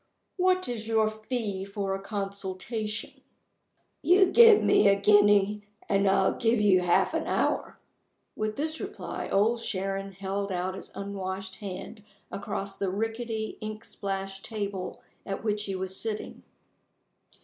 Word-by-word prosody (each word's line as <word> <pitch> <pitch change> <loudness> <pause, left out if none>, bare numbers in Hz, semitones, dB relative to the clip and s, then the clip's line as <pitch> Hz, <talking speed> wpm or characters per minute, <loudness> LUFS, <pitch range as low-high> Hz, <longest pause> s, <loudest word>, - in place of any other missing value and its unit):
"What 370 0 +2
is 225 -3 -4
your 220 -1 +2
fee 215 -3 -3
for 200 0 -3
a 195 - -3
consultation?" 200 +2 -4 0.8
"You 365 +1 +5
give 460 -3 +8
me - - +5
a 200 - +6
guinea, 205 0 +5 0.3
and 200 0 +2
I'll 195 - +3
give 230 -1 +2
you 200 -3 +5
half 175 -1 +2
an - - -1
hour." - - 0 0.6
With 215 0 -2
this 315 +2 -2
reply 400 +1 -5
Old 225 +4 +2
Sharon 195 -1 -3
held 195 +1 -3
out 185 +1 -1
his 190 - -9
unwashed 195 -1 -5
hand 205 +2 -7 0.3
across 200 0 -4
the 195 - 0
rickety 225 +2 -3
ink 215 0 -6
splashed 195 -1 -5
table 200 -4 -4 0.2
at 195 +1 -5
which 210 -1 -1
he 195 - -3
was 190 0 -4
sitting. 215 +1 -4
205 Hz, 140 wpm, -28 LUFS, 195-220 Hz, 0.8 s, give